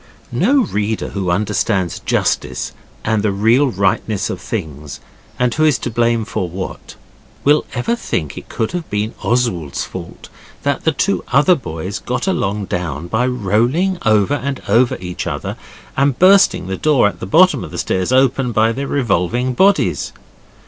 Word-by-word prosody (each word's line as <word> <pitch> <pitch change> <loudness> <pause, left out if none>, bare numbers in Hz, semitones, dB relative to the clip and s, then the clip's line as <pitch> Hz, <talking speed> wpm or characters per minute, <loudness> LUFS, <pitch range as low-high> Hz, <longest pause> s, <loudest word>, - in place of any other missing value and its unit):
No 245 - +3
reader 105 - -2
who 95 -3 -3
understands 95 -1 0
justice - - -1 0.3
and 110 -1 +1
the 105 -1 +1
real 115 +8 +3
rightness 100 -1 0
of 90 - -6
things, 75 - -5 0.4
and 125 -1 +1
who 155 - +1
is 150 -5 +4
to 120 - -4
blame 115 -1 +1
for 90 -4 -3
what, 95 +2 -7 0.5
will 150 +2 +4
ever 130 - 0
think 80 - -3
it - - -10
could 110 - -2
have 175 -2 -4
been 105 +2 -2
Oswald's 115 - 0
fault - - -9 0.4
that 140 -1 -1
the 160 - +4
two 200 +6 0
other 150 +7 +5
boys 95 - -4
got 125 +6 -3
along 105 - -1
down 85 -4 -4
by 120 +5 +1
rolling 125 - +1
over 110 +3 +3
and 140 0 -2
over 120 +4 +3
each 90 -1 -5
other, - - -4 0.4
and 135 -2 +2
bursting 185 - +5
the 95 0 -3
door 150 -8 +3
at 105 - -5
the - - -6
bottom 165 - +4
of - - -7
the 85 - -8
stairs 95 +5 -1
open 130 -1 +2
by 110 0 +3
their 140 +4 -3
revolving 120 0 0
bodies. 120 - +2
115 Hz, 165 wpm, -18 LUFS, 95-135 Hz, 0.5 s, other